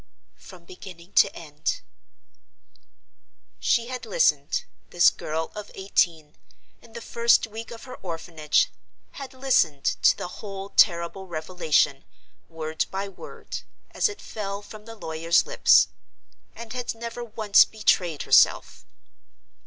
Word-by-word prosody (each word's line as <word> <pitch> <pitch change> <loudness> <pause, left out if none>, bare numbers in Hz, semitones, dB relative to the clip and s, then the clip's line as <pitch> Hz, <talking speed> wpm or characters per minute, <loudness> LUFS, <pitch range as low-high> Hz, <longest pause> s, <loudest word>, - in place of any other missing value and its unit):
"From 180 -3 -14
beginning 180 0 -12
to - - +4
end." - - -4 1.8
She 235 - +2
had 255 -2 -5
listened—this 165 - +1
girl 160 +1 -4
of 210 -1 -8
eighteen, 165 -5 0 0.5
in 230 - -18
the 235 - -7
first 235 0 +3
week 225 +1 -8
of 230 -1 -10
her 255 -1 -10
orphanage, 165 -3 -1 0.4
had 275 -2 -9
listened 180 - +1 0.2
to - - +5
the - - -5
whole 195 -1 -7
terrible 180 0 +2
revelation, 155 -4 0 0.5
word 160 -1 -3
by 195 +1 -4
word, 195 - -9 0.3
as - - +1
it 410 - -9
fell 200 -1 -5
from 210 +1 -12
the 225 0 -10
lawyer's 165 -3 +1
lips; - - +5 0.7
and 230 0 -8
had 245 -2 -4
never 235 +1 -6
once 215 -3 +4
betrayed 180 -7 0
herself! - - +3
195 Hz, 120 wpm, -25 LUFS, 165-225 Hz, 1.8 s, to